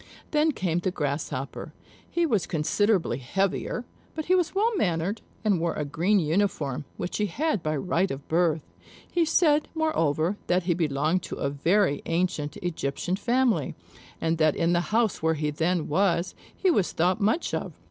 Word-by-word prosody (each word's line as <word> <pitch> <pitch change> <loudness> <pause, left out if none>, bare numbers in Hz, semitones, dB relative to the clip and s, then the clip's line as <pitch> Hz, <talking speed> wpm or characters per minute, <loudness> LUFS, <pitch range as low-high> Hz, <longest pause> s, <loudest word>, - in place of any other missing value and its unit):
Then 305 +1 +3
came 175 - -1
the 180 - -1
Grasshopper. 140 -4 -3 0.4
He 345 0 +1
was 220 - +1
considerably 170 - +1
heavier, 195 - -1 0.3
but 315 -1 -3
he 365 - +2
was 360 0 +1
well 440 +3 +2
mannered, 180 - 0 0.2
and 200 -5 +3
wore 170 0 -1
a 150 - -2
green 170 +9 +2
uniform, 155 -5 0
which 180 - -3
he 210 - +1
had 280 - -1
by 155 -1 -1
right 180 +5 0
of 135 +1 -6
birth; 160 -2 +2 0.5
he 345 -1 +2
said, 300 -2 +3
moreover, 175 - +1
that 180 0 +2
he 175 0 +2
belonged 160 +1 +1
to - - -6
a 140 - -2
very 165 +2 +2
ancient 165 -3 -1
Egyptian 175 +1 -2
family, 245 +3 +1 0.4
and 165 0 0
that 155 -2 +4
in 170 +1 +2
the 175 - +3
house 220 -2 +1
where 160 0 +2
he 150 0 -1
then 165 +2 0
was, 180 +1 +1 0.2
he 375 - +3
was 200 - +1
thought 185 +6 +1
much 220 +12 +1
of. - - -2
175 Hz, 170 wpm, -26 LUFS, 155-210 Hz, 0.5 s, that